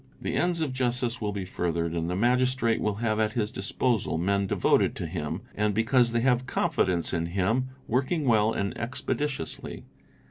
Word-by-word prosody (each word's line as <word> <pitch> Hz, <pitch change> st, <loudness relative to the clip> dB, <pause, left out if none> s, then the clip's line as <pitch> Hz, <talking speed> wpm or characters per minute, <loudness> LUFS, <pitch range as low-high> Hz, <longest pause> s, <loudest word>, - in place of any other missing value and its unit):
The -, -, -3 dB
ends 175 Hz, -1 st, +1 dB
of 145 Hz, -5 st, -1 dB
justice 125 Hz, -1 st, -1 dB
will 105 Hz, -1 st, -1 dB
be 100 Hz, -2 st, -4 dB
furthered, 85 Hz, -2 st, -2 dB
and 85 Hz, 0 st, -1 dB
the 90 Hz, -, -1 dB
Magistrate 125 Hz, +1 st, +2 dB
will 105 Hz, -1 st, 0 dB
have 110 Hz, -1 st, +1 dB
at 110 Hz, 0 st, +1 dB
his: 110 Hz, -3 st, -1 dB
disposal 115 Hz, -3 st, 0 dB
men 100 Hz, +3 st, +1 dB
devoted -, -, +2 dB
to -, -, -4 dB
him, 80 Hz, -2 st, -4 dB
and, 105 Hz, -1 st, 0 dB
because 120 Hz, +2 st, +3 dB
they 120 Hz, 0 st, +1 dB
have 125 Hz, 0 st, +2 dB
confidence 85 Hz, -1 st, 0 dB
in 85 Hz, -1 st, 0 dB
him, 100 Hz, +8 st, 0 dB
i -, -, -17 dB
working 135 Hz, +6 st, 0 dB
well 110 Hz, -3 st, +4 dB
and 100 Hz, -2 st, -2 dB
expeditiously. 130 Hz, -, -3 dB
110 Hz, 180 wpm, -27 LUFS, 95-125 Hz, -, well